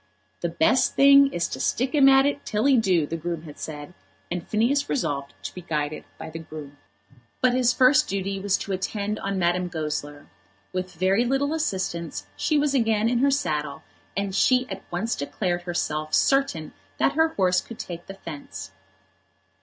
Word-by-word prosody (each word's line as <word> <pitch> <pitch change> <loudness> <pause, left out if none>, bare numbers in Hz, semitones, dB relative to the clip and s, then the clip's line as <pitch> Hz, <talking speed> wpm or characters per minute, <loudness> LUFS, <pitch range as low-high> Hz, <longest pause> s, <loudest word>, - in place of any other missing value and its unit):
"The 170 - -1
best 175 +10 +2
thing 275 0 +7
is 170 0 -1
to - - -5
stick 255 +4 0
him 275 -3 +6
at 270 0 +6
it 285 0 -1
till 210 +4 -1
he 275 -1 +5
do," 185 -9 +3
the 160 - -4
groom 165 0 -4
had 150 -3 -11
said; 145 -2 -7 0.4
and 175 -1 -4
Phineas 250 +7 +1
resolved 140 - -2
to - - -5
be 180 - -8
guided 155 -2 -3
by 160 0 -8
the 165 - -6
groom. 150 -3 -10 0.6
But 255 -1 +3
his 250 -1 +3
first 255 +1 +4
duty 195 0 -2
was 195 0 +1
to 200 - -6
attend 200 +2 -2
on 195 0 -2
Madame 180 0 +1
Goesler. 150 -3 -4 0.5
With 185 0 -4
very 190 +6 +2
little 270 +4 0
assistance 170 - -2
she 300 - +1
was 290 -1 +1
again 225 -3 +2
in 240 0 +1
her 280 +2 +4
saddle, 150 - -1 0.3
and 200 -1 -1
she 255 +5 +3
at 190 0 -5
once 205 +7 -1
declared 175 +5 -2
herself 155 -3 -2
certain 270 - +1 0.2
that - - +3
her 320 +2 +4
horse 180 -2 +3
could 230 - -11
take 170 -1 -7
the 195 - -8
fence. 145 - -8
190 Hz, 180 wpm, -25 LUFS, 160-250 Hz, 0.6 s, thing